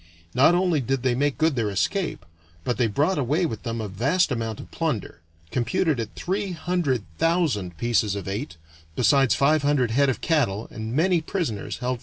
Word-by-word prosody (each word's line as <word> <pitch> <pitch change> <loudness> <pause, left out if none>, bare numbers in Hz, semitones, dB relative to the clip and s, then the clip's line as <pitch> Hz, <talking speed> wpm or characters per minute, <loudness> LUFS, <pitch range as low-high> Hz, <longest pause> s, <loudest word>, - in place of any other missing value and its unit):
Not 145 +7 +5
only 175 -5 +2
did 130 0 -1
they 130 -2 +2
make 140 +3 0
good 160 -2 +2
their 115 -4 0
escape, 155 - -1 0.4
but 125 - -1
they 120 - +2
brought 145 - +1
away 150 +7 +1
with 110 -9 -4
them 115 -1 -4
a 110 - -3
vast 140 - +1
amount 115 -3 -2
of - - -10
plunder, 120 - -3 0.3
computed 140 +4 0
at 115 -2 -5
three 195 +1 -2
hundred 165 - -1 0.2
thousand 145 - +1
pieces 110 -1 +1
of 100 - -5
eight, 105 - -4 0.4
besides 135 +2 +4
five 150 +2 +3
hundred 140 -5 +2
head 140 +4 +3
of 130 - -1
cattle 120 - 0
and 110 +2 -5
many 175 +2 +3
prisoners 155 - -3
held - - -16
for 125 +1 -1
ransom. 125 - -3
130 Hz, 195 wpm, -24 LUFS, 115-160 Hz, 0.4 s, Not